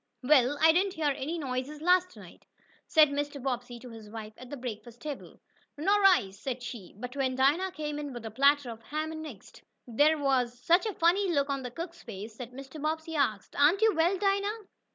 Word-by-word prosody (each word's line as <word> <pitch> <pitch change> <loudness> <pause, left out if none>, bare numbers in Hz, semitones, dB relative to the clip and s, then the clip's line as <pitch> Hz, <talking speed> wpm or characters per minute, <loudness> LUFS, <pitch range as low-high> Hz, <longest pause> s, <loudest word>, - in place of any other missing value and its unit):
"Well, 265 0 +4
I 320 +1 +7
didn't 370 +3 +1
hear 305 -3 +1
any 310 +6 -3
noises 270 0 -4
last 365 +2 +2
night," - - -14 0.4
said 310 -2 +6
Mr. 285 0 -3
Bobbsey 245 -2 -3
to 250 - -10
his 220 -2 -11
wife 215 -1 -8
at 255 - -12
the 285 - -6
breakfast 240 -1 -7
table. 295 +1 -8 0.4
"Nor 400 +7 +2
I," 360 - +5
said 245 +5 -5
she. 225 -8 -8
But 250 +4 -7
when 265 -2 0
Dinah 295 +9 +2
came 300 -1 -4
in 290 -1 -5
with 240 -3 -8
a 220 - -5
platter 280 +1 +3
of 225 0 -10
ham 310 +6 -4
and 315 0 -6
eggs, 225 -10 -12 0.3
there 290 +7 +3
was 260 -4 +1
such 345 - +3
a 420 - -4
funny 360 +3 +3
look 280 -3 +1
on 275 -1 -2
the 250 - -5
cook's 335 +6 -7
face 215 -1 -8
that 245 -2 -7
Mrs. 270 +3 -10
Bobbsey 320 +1 -2
asked: 220 -9 -1
"Aren't 325 +9 +4
you 445 -1 +5
well, 340 +4 +2
Dinah?" 400 +2 0
285 Hz, 210 wpm, -29 LUFS, 245-325 Hz, 0.4 s, I